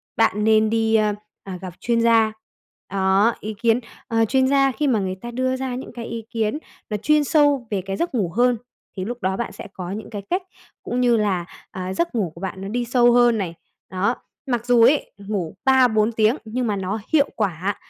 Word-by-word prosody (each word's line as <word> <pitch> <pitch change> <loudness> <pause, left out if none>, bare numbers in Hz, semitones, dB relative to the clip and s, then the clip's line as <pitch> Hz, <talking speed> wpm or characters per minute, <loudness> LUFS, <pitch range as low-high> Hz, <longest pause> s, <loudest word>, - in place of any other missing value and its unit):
bạn 210 -2 +2
nên 220 0 +4
đi, 225 0 +2
a, 215 -1 +3 0.3
à, 190 -2 -6
gặp 185 -3 -7
chuyên 235 -1 +1
gia. 225 -1 +4 0.6
Đó, 195 +3 +3
ý 215 +1 -5
kiến 230 0 +3 0.3
ờ, 225 -2 +2
chuyên 260 +3 +2
gia 275 -1 +3
khi 295 +2 -1
mà 230 -5 +2
người 185 -1 -2
ta 240 - -6
đưa 255 +2 0
ra 260 -1 -3
những 255 - -7
cái 235 -1 -6
ý 230 -1 -5
kiến 225 +2 -1 0.3
nó 210 - -1
chuyên 300 +7 +3
sâu 290 -5 +3
về 195 - 0
cái 195 0 -3
giấc 340 -5 -2
ngủ 200 -7 0
hơn, 245 0 +3 0.4
thì 185 - -3
lúc 240 +1 -5
đó 190 +1 0
bạn 235 - -3
sẽ - - -9
có 180 -1 -6
những 210 +1 -6
cái 205 -2 -5
cách 365 +2 +1 0.4
cũng 250 +1 -1
như 240 -2 +4
là, 195 -5 0 0.3
à, 185 0 -4
giấc 340 - -1
ngủ 195 -8 0
của 170 - -12
bạn 190 0 -5
nó 195 - -5
đi 240 +3 -2
sâu 240 0 +4
hơn 240 -2 +5
này, 180 -5 -3 0.4
đó. 195 +6 0 0.3
Mặc 240 -3 -1
dù 245 -1 +4
ấy, 275 +5 +3
ngủ 200 -5 -4
3-4 245 -5 +4
tiếng 220 +3 +3
nhưng 240 +3 -2
mà 210 - 0
nó 195 +3 -3
hiệu 290 -2 +4
quả, 195 -1 -1
225 Hz, 220 wpm, -22 LUFS, 200-245 Hz, 0.6 s, hơn